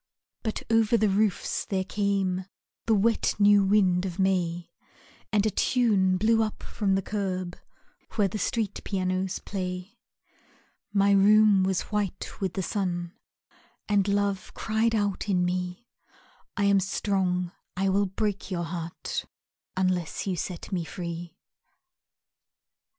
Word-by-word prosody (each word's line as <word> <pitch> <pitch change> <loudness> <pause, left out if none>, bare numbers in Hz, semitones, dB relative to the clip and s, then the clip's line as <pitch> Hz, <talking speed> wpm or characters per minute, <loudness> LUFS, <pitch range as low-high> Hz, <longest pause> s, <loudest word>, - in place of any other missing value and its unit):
But 220 - -3
over 225 0 +4
the 215 -1 +3
roofs 200 0 +1
there 190 -2 -1
came 195 -2 0 0.4
The 225 - +4
wet 220 +3 +2
new 205 -1 +6
wind 190 -3 +3
of 185 -2 -4
May, 175 -3 0 0.6
And 210 -1 +2
a 215 - +2
tune 200 -6 +2
blew 225 +3 +3
up 215 -1 -3
from 195 -2 0
the 195 - 0
curb 185 -4 -3 0.6
Where 210 -3 +3
the 210 +3 -4
street 210 0 -2
pianos 185 -1 -1
play. 180 0 -5 0.9
My 200 0 +3
room 205 0 +6
was 190 -1 +1
white 205 -2 -3
with 190 -2 -1
the 190 - -1
sun 175 -3 -2 0.7
And 205 -2 +2
Love 200 -1 0
cried 225 +1 +1
out 205 -1 -1
in 180 -2 +2
me, 180 +4 -3 0.7
"I 200 - +1
am 200 -1 +5
strong, 185 -2 0 0.3
I 195 +1 +2
will 200 +1 +2
break 205 +1 -2
your 175 -3 -2
heart 170 0 -4 0.5
Unless 185 -3 0
you 190 -2 -1
set 175 +2 -5
me 180 -3 -1
free." 170 0 -6
195 Hz, 135 wpm, -27 LUFS, 180-205 Hz, 0.9 s, new